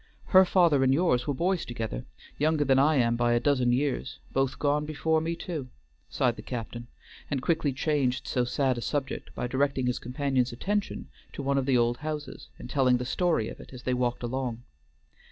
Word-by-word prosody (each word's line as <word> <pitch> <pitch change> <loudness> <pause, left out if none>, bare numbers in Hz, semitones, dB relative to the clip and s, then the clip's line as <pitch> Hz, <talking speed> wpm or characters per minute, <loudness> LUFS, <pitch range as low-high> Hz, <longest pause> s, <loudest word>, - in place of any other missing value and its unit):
Her 190 -1 +7
father 170 -7 +4
and 130 - +4
yours 135 -4 +2
were 145 - +1
boys 180 +5 0
together, 110 - -5 0.3
younger 150 0 +2
than 135 -1 +4
I 150 +3 +4
am 120 -3 +3
by 120 0 +2
a 120 - +3
dozen 125 -2 +2
years, 135 +1 -1 0.2
both 135 -1 0
gone 145 0 +1
before 155 +1 0
me 165 +1 -2
too," 160 -7 -5 0.4
sighed - - +1
the - - -7
captain, 120 0 -6 0.4
and 140 - 0
quickly 155 +1 +1
changed 135 -2 0
so 125 - 0
sad 130 0 0
a - - -6
subject 140 +2 -3
by - - -2
directing 135 +1 0
his 125 0 0
companion's 130 0 0
attention 205 +12 -2 0.3
to 140 - -5
one 140 0 +2
of 135 - -3
the 130 -2 +4
old 120 0 +2
houses, 150 0 -6
and - - -9
telling 130 -3 +3
the 125 - -4
story 155 -4 +1
of - - -8
it - - -13
as 125 -1 -10
they 125 - 0
walked 125 -1 -1
along. 120 -1 -3
135 Hz, 200 wpm, -28 LUFS, 125-150 Hz, 0.4 s, Her